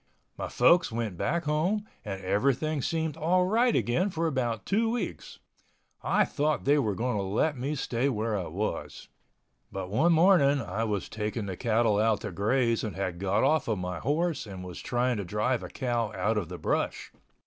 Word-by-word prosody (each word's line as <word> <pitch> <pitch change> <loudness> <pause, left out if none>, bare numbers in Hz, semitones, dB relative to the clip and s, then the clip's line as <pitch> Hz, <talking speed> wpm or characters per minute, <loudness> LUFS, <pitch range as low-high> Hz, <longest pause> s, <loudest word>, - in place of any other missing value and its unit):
My - - -4
folks 165 +7 +4
went 110 -4 -3
back 170 - -1
home 175 +8 0 0.2
and 100 -3 -5
everything 140 +9 +1
seemed 160 +1 -1
all 180 +3 +2
right 230 +5 +3
again 175 +12 +1
for 165 -2 -2
about 120 -8 -1
two 225 +3 +1
weeks. 240 +1 -4 0.6
I - - +2
thought 150 +1 -1
they 145 +2 +4
were 110 -7 0
going 120 0 -1
to - - 0
let 105 +11 0
me 135 +4 -3
stay 130 -1 0
where 110 -3 -1
I 95 -4 -3
was. 100 +7 -4 0.6
But 95 -1 -5
one 160 +11 +3
morning 160 -5 +5
I 110 0 -2
was 105 -3 -2
taking 105 0 -3
the 95 -2 -4
cattle 110 -1 +2
out 110 0 +2
to 105 -4 -5
graze 115 +5 +1
and 110 - -4
had 95 -3 -3
got 100 +1 +1
off 155 +1 +2
of 110 -3 0
my 90 -1 -4
horse 150 0 -1
and 95 -2 -8
was 90 -1 -8
trying 125 -1 0
to 100 - -2
drive 105 +6 0
a 90 - -7
cow 120 -4 -1
out 105 +4 0
of 95 -6 -2
the 90 - -6
brush. - - -2
120 Hz, 190 wpm, -28 LUFS, 105-155 Hz, 0.6 s, morning